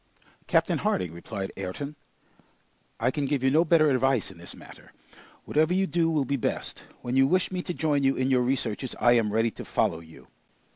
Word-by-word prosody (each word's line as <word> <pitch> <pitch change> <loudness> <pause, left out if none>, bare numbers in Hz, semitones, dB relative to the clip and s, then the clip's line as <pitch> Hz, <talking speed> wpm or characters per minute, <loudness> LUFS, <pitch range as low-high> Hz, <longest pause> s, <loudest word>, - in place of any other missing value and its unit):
"Captain - - +2
Harding," 90 -3 -1
replied 95 +3 -6
Ayrton, 100 +11 -5 1.0
"I 120 +3 +1
can 145 -2 -2
give 140 -2 -1
you 130 - +3
no 160 +4 +4
better 160 -2 +4
advice 130 -5 +1
in 85 - -15
this 85 - -9
matter. - - -15 0.5
Whatever 155 +4 +2
you 195 +1 +2
do 170 -3 +1
will 150 -4 +1
be 140 +2 -1
best; - - -3 0.2
when 120 +1 -2
you 135 0 +5
wish 185 +5 +1
me 180 -1 -2
to 180 - -5
join 155 -4 0
you 135 0 +2
in 130 +1 0
your 125 -1 +4
researches, 125 -1 -1
I 120 - +5
am 115 -3 +3
ready 115 +2 +1
to - - -9
follow 80 - 0
you. 80 -1 -15
135 Hz, 200 wpm, -27 LUFS, 115-150 Hz, 1.0 s, you